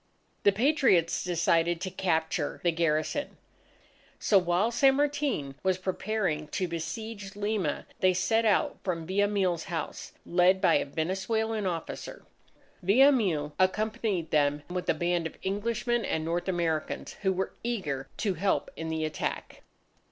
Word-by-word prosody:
The 200 - +5
Patriots 225 - +3
decided 170 -1 +2
to 185 - -3
capture 160 -4 -1
the 175 - +3
garrison. 165 - -1 0.8
So 200 - +4
while 180 +5 +1
San 270 +3 +4
Martin 280 - 0
was 190 -1 +1
preparing 185 -4 -2
to 185 +4 -2
besiege 200 +5 -5
Lima, 205 -6 -1
they 185 - +4
set 225 +5 +2
out 215 -3 +2
from 170 -4 -2
Villamil's 190 -2 +1
house, 170 -5 -5
led 180 +2 +4
by - - +4
a - - -1
Venezuelan 195 +8 -1
officer. 170 -3 -5 0.6
Villamil 200 - +4
accompanied 205 -2 0
them 145 -1 +2
with 180 0 -3
a - - +3
band 175 0 0
of - - -13
Englishmen 230 +4 -1
and 160 0 -1
North 170 +3 -2
Americans, 170 -4 -1
who 190 -2 +2
were 190 0 -2
eager 155 - -2
to 200 -3 0
help 190 +3 0
in 160 - -5
the 160 -1 -1
attack. 155 -1 -4
185 Hz, 135 wpm, -28 LUFS, 165-215 Hz, 0.8 s, The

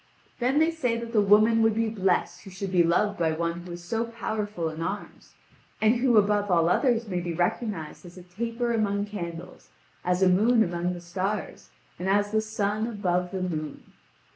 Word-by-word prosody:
Then 255 +3 +1
they 320 +2 +4
say 250 -8 -1
that 230 0 -6
the 215 - +4
woman 215 +3 +5
would 225 -1 +3
be 225 0 +1
blessed 195 -4 0
who - - -11
should 190 0 -5
be 180 -2 +4
loved 190 +4 +1
by 160 -2 +1
one 170 +1 -2
who 175 0 -8
is 175 0 -9
so 225 +6 -1
powerful 215 -6 -3
in 160 +1 -7
arms, 200 +5 -6 0.4
and 220 +3 +3
who 240 -2 +3
above 205 0 +3
all 170 -2 +3
others 235 +2 +2
may 180 -3 -2
be 175 -1 -4
recognised 175 -2 -2
as 175 0 -13
a 180 - -10
taper 230 +6 -3
among 205 -2 0
candles, 175 -4 -8 0.3
as 180 +1 +1
a - - +6
moon 220 +6 +4
among 175 0 -2
the 175 - -8
stars, 190 +4 -4 0.3
and 185 +2 -2
as 205 +1 +2
the 220 0 +2
sun 215 0 -1
above 180 -5 -1
the 185 0 -3
moon. 155 -5 -4
200 Hz, 195 wpm, -26 LUFS, 175-225 Hz, 0.4 s, a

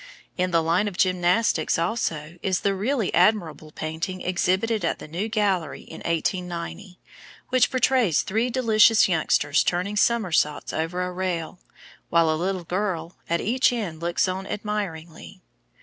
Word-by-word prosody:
In 180 0 0
the 165 -2 +2
line 170 +6 +1
of 195 -3 -5
gymnastics, 180 -1 +2
also, 165 -3 -2
is 190 -2 0
the 200 - +1
really 215 +2 -1
admirable 175 -5 +2
painting 160 +5 -5
exhibited 190 +5 0
at - - 0
the - - -10
New 180 +8 -3
Gallery 195 -8 0
in - - -11
1890, 180 +2 -3 0.5
which 255 -2 +3
portrays 250 - +2
three 225 +5 0
delicious 225 -3 +4
youngsters 155 -4 +2
turning 180 +4 -1
somersaults 190 -10 +1
over 170 +3 -2
a 180 - -3
rail, 180 -1 -3 0.5
while 165 -1 +3
a 155 +2 -1
little 185 -1 -2
girl 175 -2 -3
at 170 0 +1
each 250 +5 +2
end 200 -10 -4
looks 170 +2 +1
on 190 +1 -4
admiringly. 190 -4 -5
185 Hz, 145 wpm, -24 LUFS, 170-210 Hz, 0.5 s, delicious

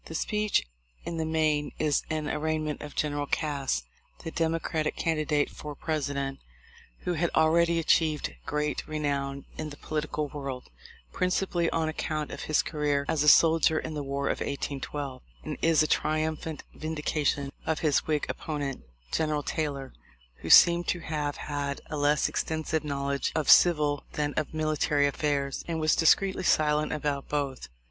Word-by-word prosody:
The 160 - -8
speech 210 - +1 0.4
in 170 - -4
the 160 -1 -1
main 155 -2 +1
is 150 -2 +1
an 155 -1 -2
arraignment 155 0 -2
of 150 -1 -8
General 145 -1 -1
Cass, 140 - -1 0.4
the 165 - -5
Democratic 160 -1 -1
candidate 155 -2 0
for 150 -1 -8
President, 140 -3 -2 0.6
who 180 - -1
had 170 +1 0
already 170 +2 +4
achieved 160 -2 +2
great 150 0 -1
renown 140 -2 -2
in 155 -1 -3
the 145 - -10
political 150 -1 -3
world, 135 -3 -6 0.4
principally 180 -2 0
on 160 -1 0
account 155 -1 -3
of - - -6
his 155 - +2
career 145 -2 0
as 160 -3 +1
a 150 - +2
soldier 160 0 +5
in 155 - -3
the 150 - -3
war 140 0 -3
of - - 0
1812, 140 -1 -4 0.2
and - - -4
is 165 -1 +4
a - - 0
triumphant 155 0 -1
vin 160 +1 -5
dication 145 -2 0 0.2
of 160 - 0
his 150 -3 +2
Whig 150 -2 +1
opponent, 145 -4 -4 0.3
General 155 -2 0
Taylor, 140 -4 -3 0.4
who 80 - -7
seemed 170 - +7
to 175 - 0
have 150 -2 -3
had 145 -1 -3
a - - -2
less 145 0 +2
extensive 160 0 -2
knowledge 140 -1 -1
of 155 -3 +4
civil 150 -5 +5
than 145 -1 -1
of 155 - -2
military 155 -2 +1
affairs, 140 -1 -1
and 165 -1 -2
was 155 -1 +3
discreetly 190 +4 +3
silent 150 -3 +2
about 145 -2 -2
both. 140 - -2
150 Hz, 155 wpm, -28 LUFS, 145-160 Hz, 0.6 s, seemed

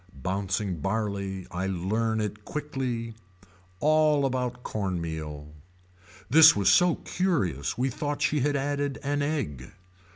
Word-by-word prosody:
Bouncing 95 +4 -2
barley 100 0 -2
I 90 +2 -2
learn 110 +5 -1
it 105 0 -4
quickly. 130 -5 -4 0.7
All 155 0 +3
about 125 -1 -2
corn 95 -4 -2
meal. 75 -2 -6 0.7
This 155 +7 +8
was 100 -1 +3
so 175 - +5
curious 120 - -1
we 130 +2 0
thought 145 +3 -3
she 150 - +2
had 145 +2 +1
added 140 0 -1
an 145 +1 0
egg. 125 - -3
115 Hz, 125 wpm, -27 LUFS, 95-145 Hz, 0.7 s, This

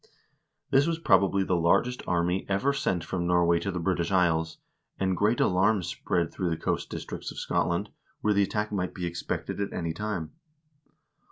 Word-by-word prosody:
This 140 +2 +4
was 165 -1 0
probably 100 - +3
the 95 - 0
largest 90 +9 +2
army 90 +2 +1
ever 115 +9 +2
sent 95 -11 -1
from 85 +1 -2
Norway 85 -1 +3
to 90 - -3
the 90 - -3
British 85 -1 0
Isles, 80 -3 +2 0.4
and 95 -1 +1
great 105 +6 +2
alarm 95 +2 +3
spread 85 0 -1
through 90 -2 -1
the 80 - -1
coast - - -2
districts - - -6
of - - -9
Scotland, 85 +4 -1 0.3
where 105 - +2
the 100 - +3
attack 105 +2 -1
might 90 -3 -2
be 90 - -3
expected 85 +3 -3
at 100 - -2
any 85 -1 -3
time. 105 -4 -4
95 Hz, 175 wpm, -28 LUFS, 85-100 Hz, 0.4 s, This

